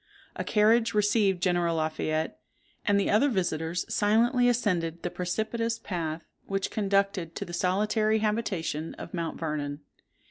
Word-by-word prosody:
A - - -3
carriage 220 0 +3
received 205 -3 +2
General 175 -2 +2
Lafayette; 155 - -1 0.5
and 200 -1 +4
the 200 - +1
other 235 +8 +4
visitors 175 - -1
silently 240 +4 +3
ascended 175 -8 0
the 175 - -2
precipitous 225 +5 -2
path 165 -6 -4 0.2
which 195 -1 -2
conducted 195 -4 0
to - - -4
the 175 - -9
solitary 210 +5 +1
habitation 205 -8 -2
of - - -9
Mount 170 -2 -3
Vernon. 150 -2 -3
195 Hz, 135 wpm, -28 LUFS, 165-215 Hz, 0.5 s, and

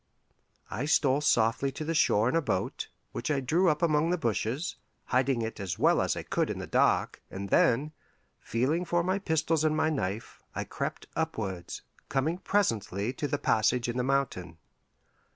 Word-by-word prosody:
I 125 - -2
stole 145 -2 +3
softly 115 0 +2
to 155 - -5
the 165 - -1
shore 115 -8 +3
in 125 - +1
a 165 - +3
boat, 95 - -2 0.2
which 120 - -4
I 145 -2 +2
drew 165 +8 +2
up 150 +2 0
among 155 0 +3
the 180 - +1
bushes, 130 - -2 0.3
hiding 130 -2 +1
it 110 0 -5
as 95 -3 -3
well - - +4
as - - 0
I - - -4
could - - 0
in - - -3
the - - -5
dark, - - +2
and 100 +1 -6
then, 135 +10 +3 0.5
feeling 135 +10 0
for 175 0 +1
my 185 +3 0
pistols 160 -3 +1
and 155 0 +2
my 155 - +2
knife, 110 -6 -3
I - - -1
crept - - -4
upwards, 105 - -3 0.3
coming 155 +6 0
presently 115 - 0
to 145 - -3
the 145 - -1
passage 120 -2 +2
in 120 +1 -2
the 125 - +1
mountain. 125 -11 -1
135 Hz, 180 wpm, -29 LUFS, 115-160 Hz, 0.5 s, well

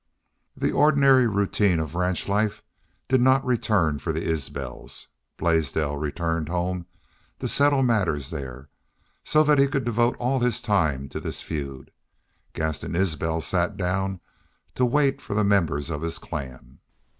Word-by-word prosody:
The - - 0
ordinary 140 -4 +5
routine 100 -3 +1
of 80 -1 -4
ranch 90 0 -1
life 105 +1 0 0.4
did 130 -1 +3
not 130 +2 +4
return 105 - +1
for 80 - -2
the 80 +1 -3
Isbels. 70 -5 -5 0.3
Blaisdell 80 -3 0
returned 80 +2 -2
home 90 0 -2 0.5
to - - -3
settle 140 -1 +3
matters 95 - 0
there, 65 0 -7 0.5
so 155 0 +4
that 150 -2 +4
he 140 - +5
could 135 -1 -1
devote 120 +1 +1
all 130 +2 0
his 120 -1 +1
time 80 - 0
to - - -5
this - - -5
feud. 70 -4 -6 0.6
Gaston 80 +1 -3
Isbel 80 -3 0
sat 90 +4 0
down 95 0 -1 0.5
to 125 - +2
wait 140 +2 +2
for 100 - -5
the 105 - +2
members 85 -7 +1
of 75 -2 -3
his 85 0 -2
clan. 65 -4 -8
90 Hz, 145 wpm, -25 LUFS, 80-120 Hz, 0.6 s, ordinary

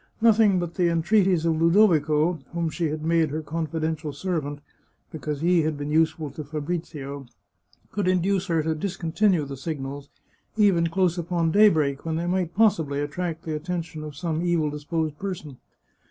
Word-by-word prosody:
Nothing 220 -3 +5
but 175 -1 -2
the 175 -2 +2
entreaties 180 0 +2
of 160 -1 +1
Ludovico, 165 -3 +3
whom 170 -2 -1
she 170 0 -1
had 155 +1 -4
made 165 -1 +2
her 155 +2 -4
confidential 160 0 -3
servant, 145 -2 -3 0.5
be 160 - -7
cause 150 -1 -4
he 175 0 +3
had 155 -1 -1
been 145 +1 -4
useful 160 -1 +1
to 150 +3 -7
Fabrizio, 145 -2 -5 0.6
could 205 -2 -1
induce 185 +1 +1
her 165 -3 +1
to 160 +1 0
discontinue 175 0 0
the 140 0 -6
signals, 140 -1 -5 0.5
even 190 -6 +4
close 180 0 +1
upon 170 -1 0
daybreak, 160 -9 +4
when 160 -1 -2
they 170 +2 -2
might 180 -1 -1
possibly 165 -10 +2
attract 165 +2 -3
the 160 -1 -3
attention 160 -1 -4
of 150 -2 -8
some 160 0 -2
evil 170 -4 +1
dis 150 0 -8
posed 160 -2 -2
person. 170 -9 -5
165 Hz, 170 wpm, -25 LUFS, 150-180 Hz, 0.6 s, Nothing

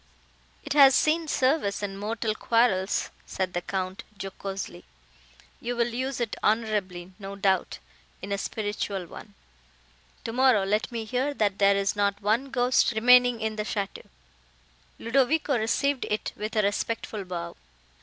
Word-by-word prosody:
"It - - -3
has 275 -2 +7
seen 320 +1 +2
service 260 -8 +1
in 195 -1 -3
mortal 215 +2 -2
quarrels," 220 -4 +1 0.2
said 185 -1 -3
the 175 - -1
Count, 185 +1 -4 0.2
jocosely, 195 - -6 0.8
"you 245 +1 -3
will 235 0 +1
use 260 +1 -2
it 235 -3 -2
honourably, 205 -5 0
no 195 0 -7
doubt, 190 -2 0 0.4
in 200 - -7
a 200 - 0
spiritual 205 -3 -3
one. 205 +4 -12 0.9
Tomorrow, 240 -2 +3
let 210 +5 0
me 230 -2 -4
hear 260 +5 -1
that 205 -4 0
there 200 0 +5
is 200 0 0
not 200 0 0
one 220 +7 0
ghost 250 -2 +2
remaining 245 +1 +5
in 220 0 -2
the 210 - -1
château." 205 -2 -4 0.9
Ludovico 275 +4 +1
received 255 +4 0
it 210 - -2
with 215 +2 -5
a 215 - +3
respectful 205 +1 -2
bow. 170 -2 -6
215 Hz, 145 wpm, -27 LUFS, 195-245 Hz, 0.9 s, has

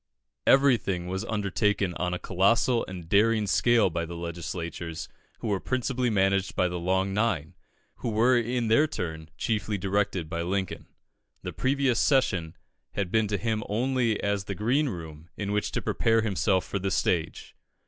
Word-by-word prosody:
Everything 120 -10 +4
was 95 +3 -3
undertaken 105 -3 0
on 90 +1 -2
a 90 - -1
colossal 110 +7 +2
and 90 -3 -8
daring 110 +3 +3
scale 115 0 +3
by 85 +1 -2
the 85 +1 -6
legislators, 85 -1 -5 0.3
who - - -3
were 100 -3 0
principally 130 +1 -1
managed 95 -2 +1
by 90 - +2
the 90 0 -4
Long 95 +2 0
Nine, 100 -8 0 0.4
who 120 - -3
were 115 +4 +3
in 120 0 0
their 130 +8 +4
turn 80 - -5
chiefly 105 -2 -1
directed 95 -3 -1
by 85 +1 -3
Lincoln. 95 +2 -3 0.6
The - - -5
previous 130 -2 +1
session 95 - +2 0.4
had 100 -3 -2
been 110 -1 +2
to 100 0 -1
him 110 -1 -1
only 120 0 +1
as 100 -1 0
the 100 - -4
green 130 - +1
room 80 -4 -8
in 100 -1 -3
which 105 0 0
to - - -2
prepare 115 0 +2
himself 95 -3 +1
for 100 - -3
the 95 +1 -1
stage. 85 -4 -1
100 Hz, 165 wpm, -27 LUFS, 90-115 Hz, 0.6 s, Everything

